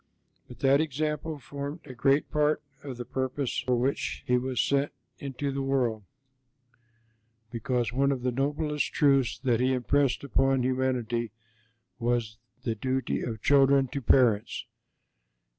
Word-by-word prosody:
But 125 - -13
that 140 +1 +5
example 155 +1 -2
formed 140 +4 -6
a 130 - -9
great 135 +4 +2
part 150 0 +1 0.2
of 135 -4 -7
the 120 - -5
purpose 130 +1 -2
for 125 - 0
which 130 +3 -1
He 125 - +2
was 125 0 -1
sent 140 +1 +2 0.3
into 140 0 -3
the 135 0 -2
world, 130 -5 0 1.5
because 120 0 -1
one 140 +2 +2
of 130 -3 -3
the 125 - +1
noblest 150 +3 -1
truths 135 -5 +3
that 120 -4 +2
He 130 +1 +2
impressed 135 +2 +1
upon 135 -1 +2
humanity 125 -3 0 0.7
was 115 -2 -1 0.2
the 115 - 0
duty 130 +4 -1
of 110 -3 -5
children 135 -1 +5
to 140 +1 -4
parents. 115 -4 +3
130 Hz, 140 wpm, -28 LUFS, 125-140 Hz, 1.5 s, that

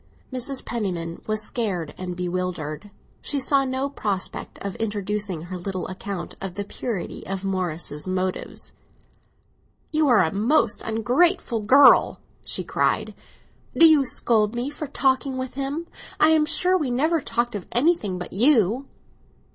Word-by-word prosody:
Mrs. 255 +1 -1
Penniman 175 -8 -3
was 215 0 0
scared 200 - -3
and 180 -1 -5
bewildered; 180 -2 -3 0.3
she 285 - -1
saw 275 +1 +3
no 260 +1 -1
prospect 205 -9 -4
of 200 - -3
introducing 205 -5 -2
her 180 +1 -6
little 185 0 -4
account 190 -1 -6
of 190 -2 -5
the 205 - -3
purity 200 -2 -5
of 195 0 -4
Morris's 175 -5 -3
motives. 185 0 -3 1.2
"You 310 -1 +2
are 235 -7 +5
a 160 - -1
most 230 +2 +2
ungrateful 240 - +1
girl!" 260 +7 +6 0.2
she - - -3
cried. - - 0 0.6
"Do 330 - +9
you 310 -3 +5
scold 225 -4 +1
me 245 +4 -2
for 300 0 -6
talking 265 -1 +1
with 260 -1 -4
him? 275 +5 -3 0.3
I 310 - +6
am 310 -1 +4
sure 360 +3 +3
we 305 -8 0
never 310 +6 +1
talked 240 0 -1
of 205 -4 -6
anything 240 - +1
but 180 - -7
you!" 240 +2 +3
220 Hz, 145 wpm, -24 LUFS, 185-275 Hz, 1.2 s, Do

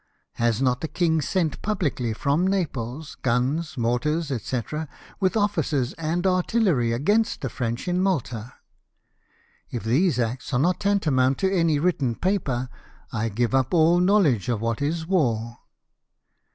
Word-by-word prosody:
Has 120 +1 +1
not 125 -1 +1
the 160 - -2
king 160 +1 +1
sent 165 -2 -1
publicly 155 - -1
from 140 +10 +1
Naples 150 -6 -3
guns, 135 +6 0
mortars, 150 +7 0
&c., 125 -1 -2 0.6
with 190 0 +1
oflicers 200 - 0
and 165 +3 -2
artillery, 185 - +2
against 205 - +1
the 135 - -3
French 120 +4 -3
in 180 +1 +1
Malta? 125 - -2 1.2
If 120 - -5
these 135 - +2
acts 120 +1 -2
are - - +3
not 175 +6 +2
tantamount 145 -10 +2
to 190 0 0
any 165 -4 +3
written 145 -7 0
paper, 140 - -1 0.5
I 115 0 -1
give 120 +4 -1
up 130 +4 +2
all 170 +2 +5
knowledge 180 - +3
of 115 -3 -1
Avhat 115 +2 -1
is 160 +3 -1
war." 120 - 0
145 Hz, 140 wpm, -24 LUFS, 120-180 Hz, 1.2 s, all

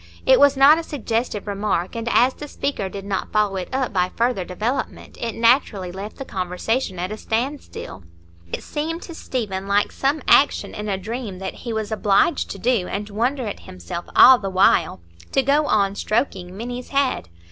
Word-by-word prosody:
It 260 - +6
was 285 -1 +5
not 285 +4 +7
a - - -4
suggestive 230 -7 -3
remark, 200 -3 -2
and 230 0 -3
as 255 +2 +4
the 295 - -8
speaker 275 -9 -3
did 195 0 -8
not 195 -1 -3
follow 210 -2 +1
it 185 - -5
up 260 -4 -1
by 180 -1 +1
further 235 -5 +1
development, 225 +9 -4
it 230 -1 -3
naturally 230 -6 +2
left 195 +4 -7
the 270 - -6
conversation 185 +3 -2
at 180 +3 -3
a 215 - -5
standstill. 235 - -4 0.5
It - - -4
seemed 320 +3 -4
to 340 - -9
Stephen 205 -11 -4
like 200 +1 +2
some 280 +1 -1
action 285 - +4
in 210 0 -5
a 195 - 0
dream 215 0 -5
that 190 0 -5
he 235 - -7
was 220 -1 -3
obliged 210 +8 +2
to - - -6
do, 225 -3 +1
and 205 +1 -4
wonder 245 +5 -1
at 205 - -5
himself 90 - -7
all 260 -1 +9
the 195 - -4
while,—to 85 - +1
go 290 +3 +2
on 200 -5 +2
stroking 195 -4 -2
Minny's 245 +2 -6
head. 275 - 0
215 Hz, 185 wpm, -22 LUFS, 195-260 Hz, 0.5 s, all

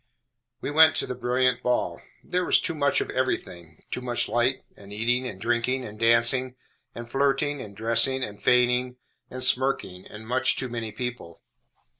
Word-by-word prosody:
We - - -4
went 160 +1 +6
to - - 0
the - - -5
brilliant 125 0 0
ball. 125 0 -1 0.2
There 180 0 -1
was - - +4
too 170 - -2
much 140 -2 +1
of - - -4
everything. 85 -10 -4
Too - - -3
much 120 -1 +1
light, 120 +2 0
and 100 0 -14
eating, 120 +4 0
and 100 -6 -8
drinking, 120 +4 -1
and 105 -1 -10
dancing, 115 +3 +2 0.4
and 120 0 -8
flirting, 140 +2 0
and 100 -1 -11
dressing, 115 +4 +2
and 105 -3 -7
feigning, 125 0 +2 0.3
and 130 0 -2
smirking, 125 -8 +1
and 110 +1 -11
much 125 +2 +2
too 130 - -2
many 115 -2 -5
people. 115 -7 -7
125 Hz, 170 wpm, -25 LUFS, 115-130 Hz, 0.4 s, went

